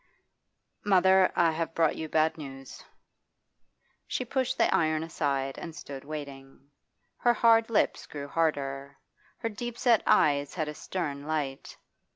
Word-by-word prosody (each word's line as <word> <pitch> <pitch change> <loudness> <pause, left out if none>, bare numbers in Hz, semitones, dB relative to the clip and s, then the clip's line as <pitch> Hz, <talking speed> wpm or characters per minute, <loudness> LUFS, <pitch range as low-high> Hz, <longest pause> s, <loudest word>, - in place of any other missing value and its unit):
'Mother, 190 -1 +4
I 170 -1 +4
have 165 0 -3
brought 160 -2 +2
you 160 - -5
bad 160 +1 +2
news.' 135 -3 -10 1.2
She 255 - -2
pushed 260 +1 -1
the - - +3
iron 155 -1 +1
aside 140 -4 -2
and 165 -2 -8
stood 135 -3 -8
waiting. 140 -2 -9 0.5
Her 240 0 +3
hard 225 0 +4
lips 225 - +1
grew 145 -1 -7
harder; 140 -3 -2 0.4
her 230 - -3
deep 240 +2 -6
set 235 -4 +4
eyes 145 -1 +3
had 155 -4 -2
a 150 - -4
stern 150 -4 -5
light. 145 -4 -3
155 Hz, 140 wpm, -28 LUFS, 140-190 Hz, 1.2 s, Mother